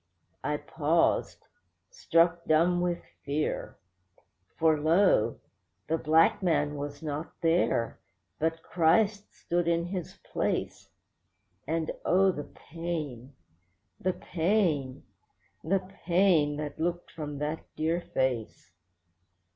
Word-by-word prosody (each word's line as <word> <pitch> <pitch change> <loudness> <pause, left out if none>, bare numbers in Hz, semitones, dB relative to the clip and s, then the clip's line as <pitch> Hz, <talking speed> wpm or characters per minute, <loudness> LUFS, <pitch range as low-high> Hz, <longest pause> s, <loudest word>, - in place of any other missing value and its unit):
I 150 0 0
paused, 160 +2 0 0.5
struck 170 - +2
dumb 175 +3 +3
with 175 -1 -1 0.2
fear. 145 +2 -2 0.8
For 160 -1 +4
lo! 155 - +3 0.5
the 165 0 +1
black 160 +6 +4
man 150 -5 +1
was 145 +2 -6
not 150 +1 -4
there, 165 -8 +1 0.4
but 160 +1 -1
Christ 200 +5 +2
stood 175 0 -2
in 170 0 +2
his 180 -1 -5
place; - - -2 0.8
And 160 0 -1
oh! 190 +1 +4
the 145 -5 -6
pain, 150 -6 -6 0.6
the 185 +1 0
pain, 165 -9 0 0.6
the 185 +2 0 0.2
pain 170 -5 +3
that 150 0 -5
looked 175 +1 -2
from 150 -3 -6
that 150 +2 -3
dear 165 +3 0
face. 125 - -2
165 Hz, 105 wpm, -29 LUFS, 150-175 Hz, 0.8 s, For